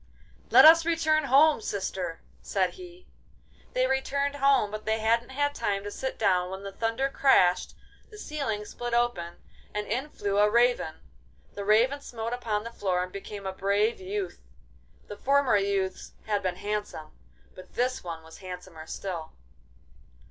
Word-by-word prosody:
'Let - - +8
us 330 +1 +9
return 320 -2 +2
home, 280 +1 +5
sister!' 190 -5 -4 0.2
said 190 -2 0
he. 360 0 -13 0.7
They 255 0 +2
returned 280 +2 0
home, 275 -7 +3
but 215 0 -6
they 220 0 +1
hadn't 230 +2 +1
had 285 +2 0
time 200 -6 -1
to 205 - -6
sit 265 +5 -4
down 180 -4 +2
when 190 +1 -7
the 200 - -6
thunder 230 +6 -1
crashed, 185 -10 +3 0.3
the 425 - -13
ceiling 275 - -3
split 240 +2 -4
open, 210 -8 0 0.4
and 210 0 -1
in 255 +8 -2
flew 200 -6 -1
a 210 0 +5
raven. 235 -7 +2 0.6
The 200 - -5
Raven 240 +7 +3
smote 230 -3 -5
upon 220 -4 -2
the 230 - -7
floor 185 -5 -1
and 180 - -7
became 200 +1 -8
a 190 - -3
brave 200 +3 +1
youth. 190 - -4 0.6
The 205 - -9
former 275 0 +3
youths 195 -1 -2
had 210 -2 0
been 185 -2 -2
handsome, 205 -5 -4 0.4
but 185 - -14
this 255 +1 0
one 165 -2 -6
was 160 0 -13
handsomer 180 -3 -9
still. 170 -5 -5
210 Hz, 160 wpm, -27 LUFS, 190-265 Hz, 0.7 s, us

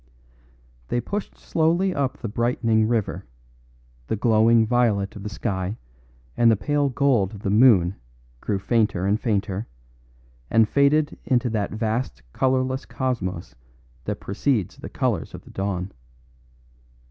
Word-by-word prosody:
They 120 - 0
pushed 200 - -5
slowly 170 +4 +1
up 140 -4 -1
the 115 - -5
brightening 115 0 +1
river; 115 -3 -1 0.8
the - - 0
glowing 115 +1 +4
violet 110 -4 +1
of 105 - -8
the 105 - -5
sky 100 -1 -3 0.6
and 120 -1 +5
the 115 - +5
pale 145 +8 0
gold 120 -7 +1
of 100 - -10
the 100 - 0
moon 105 -6 +5 0.5
grew 100 - -1
fainter 105 -3 +1
and 100 +2 +2
fainter, 100 -2 -1 0.8
and 115 -1 +4
faded 145 +4 +2
into 125 -3 +1
that 105 -3 -1
vast 110 - -3
colourless 130 0 0
cosmos 100 -10 -3 0.5
that - - -3
precedes 110 0 -1
the - - -8
colours - - -2
of - - -11
the - - -15
dawn. 95 -1 -3
115 Hz, 135 wpm, -24 LUFS, 100-130 Hz, 0.8 s, and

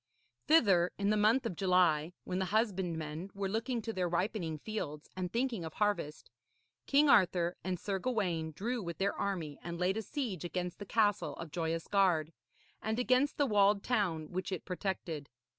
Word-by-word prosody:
Thither, 195 - +5
in 200 +1 +1
the - - +3
month 220 +5 +3
of 190 - -2
July, 180 -3 +3
when 185 0 -2
the 190 - 0
husbandmen 180 -6 -1
were 200 0 -1
looking 230 +3 -2
to 225 - -3
their 180 -3 -1
ripening 175 -2 -1
fields 150 -5 -5
and 180 -1 -3
thinking 235 -5 -1
of 160 -1 -6
harvest, 205 -8 -1 0.6
King 290 +2 +5
Arthur 180 -7 +4
and 185 -1 -2
Sir 195 +1 -2
Gawaine 180 -9 -1
drew 230 +9 -3
with 170 -4 -5
their 200 +1 +1
army 170 -8 -3
and 170 0 -5
laid 180 +3 +1
a - - -1
siege 225 - -4
against 180 0 -3
the 205 - -7
castle 210 -3 +1
of 165 -2 -8
Joyous 165 0 -2
Gard, 175 -6 +2 0.5
and 220 +1 -1
against 255 +3 +2
the 285 - +3
walled 205 -3 +3
town 180 -10 0
which 185 +1 -3
it 185 - -4
protected. 180 -6 -4
190 Hz, 175 wpm, -33 LUFS, 170-215 Hz, 0.6 s, Thither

